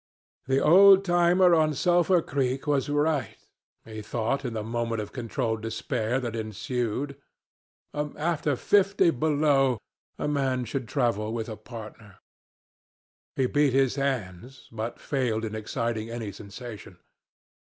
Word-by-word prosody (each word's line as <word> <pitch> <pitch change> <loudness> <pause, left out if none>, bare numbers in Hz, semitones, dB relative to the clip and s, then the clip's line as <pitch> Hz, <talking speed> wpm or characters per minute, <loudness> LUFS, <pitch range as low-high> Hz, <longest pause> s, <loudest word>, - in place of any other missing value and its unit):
The 135 0 +2
old 195 +5 +7
timer 175 0 +4
on 155 -2 +3
Sulphur 175 +2 +3
Creek 135 0 -1
was 145 -1 0
right, 145 0 0 0.5
he 110 -1 -7
thought 120 +6 -2
in 125 -3 -3
the 110 -1 -3
moment 115 0 -2
of 105 - -5
controlled 115 -2 -2
despair 115 +2 -2
that 120 -2 -4
ensued: 115 +5 -3 0.7
after 150 0 -1
fifty 195 +3 +3
below, 140 -3 +2 0.4
a - - -2
man 135 -4 0
should 120 +1 -4
travel 115 -5 0
with 115 -1 -3
a 110 - -5
partner. 110 -2 -11 1.2
He 130 - +1
beat 145 +1 +2
his 135 -1 +3
hands, 130 -3 -4
but 115 +1 -5
failed 120 -5 -1
in 110 - -5
exciting 110 0 -3
any 115 -3 -5
sensation. 105 +3 -10
130 Hz, 130 wpm, -27 LUFS, 110-145 Hz, 1.2 s, old